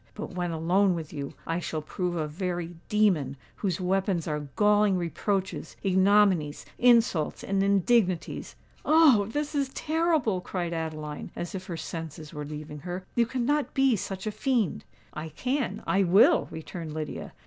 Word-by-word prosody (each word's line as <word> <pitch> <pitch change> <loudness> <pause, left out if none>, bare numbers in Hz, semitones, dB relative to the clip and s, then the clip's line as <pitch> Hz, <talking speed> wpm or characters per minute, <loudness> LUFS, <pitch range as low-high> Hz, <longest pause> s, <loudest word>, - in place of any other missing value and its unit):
But 210 - -6
when 175 -1 -2
alone 175 +4 +2
with 160 -2 -6
you, 140 -2 -5
I 165 +1 -1
shall 155 -3 -4
prove 180 +2 -3
a 155 -2 -1
very 175 +1 -3 0.2
demon, 180 -11 +2 0.2
whose 190 -4 -1
weapons 185 -2 0
are 150 -2 -3
galling 210 -2 +4
reproaches, 190 +2 -2
ignominies, 190 -5 +3
insults, 235 -10 +3
and 195 0 0
indignities." 195 -2 +1 0.3
"Oh! 300 -11 +5
this 295 +6 -3
is 280 -2 0
terrible!" 310 - +1
cried 175 -2 -3
Adeline, 155 -2 -4
as 175 - -5
if 185 -1 -6
her 170 - -4
senses 160 -1 -7
were 150 0 -5
leaving 150 0 -7
her. 180 +4 -6
"You 235 -1 +2
cannot 265 +4 0
be 270 -3 +4
such 195 0 -5
a 215 - -1
fiend." 240 - 0 0.3
"I 155 +1 -5
can—I 250 - -1
will!" 190 +3 +5
returned 160 0 -7
Lydia. 155 -1 -5
185 Hz, 150 wpm, -27 LUFS, 160-210 Hz, 0.3 s, Oh